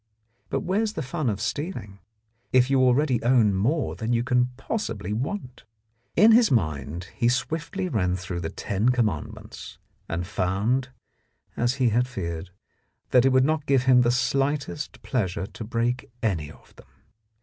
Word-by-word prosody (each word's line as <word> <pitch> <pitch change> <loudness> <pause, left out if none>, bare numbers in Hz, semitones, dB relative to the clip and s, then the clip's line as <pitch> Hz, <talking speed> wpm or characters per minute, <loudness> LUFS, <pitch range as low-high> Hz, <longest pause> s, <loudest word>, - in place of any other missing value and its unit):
But - - -1
where 190 +4 0
is 220 -1 -1
the - - -3
fun 150 0 -2
of 100 -2 -2
stealing 110 - -4 0.5
if 130 +1 +4
you 135 -1 +4
already 130 0 +3
own 120 -4 +4
more 130 +11 0
than 115 +1 -2
you 115 0 +2
can 125 0 +2
possibly 135 - -3
want? 130 - -4 0.5
In 220 +2 +7
his 225 -1 +6
mind 80 - -1
he 120 - +2
swiftly 165 +8 -2
ran 90 - 0
through 95 -1 -5
the 80 - -3
ten 100 +7 -1
com 125 -2 +3
mandments, 80 -8 -6 0.3
and 85 +1 -2
found, 105 +7 0 0.7
as 120 +2 +1
he 130 -3 +2
had 120 +3 +2
feared, 85 -6 -5 0.6
that 125 0 +5
it - - +6
would 130 0 +4
not 155 0 0
give 135 -2 +3
him 130 -1 +6
the 120 - +3
slightest 135 +4 -1
pleasure 95 -7 -1
to 110 - -9
break 120 +2 -1
any 85 -9 0
of - - -17
them. - - -16
125 Hz, 165 wpm, -25 LUFS, 100-135 Hz, 0.7 s, In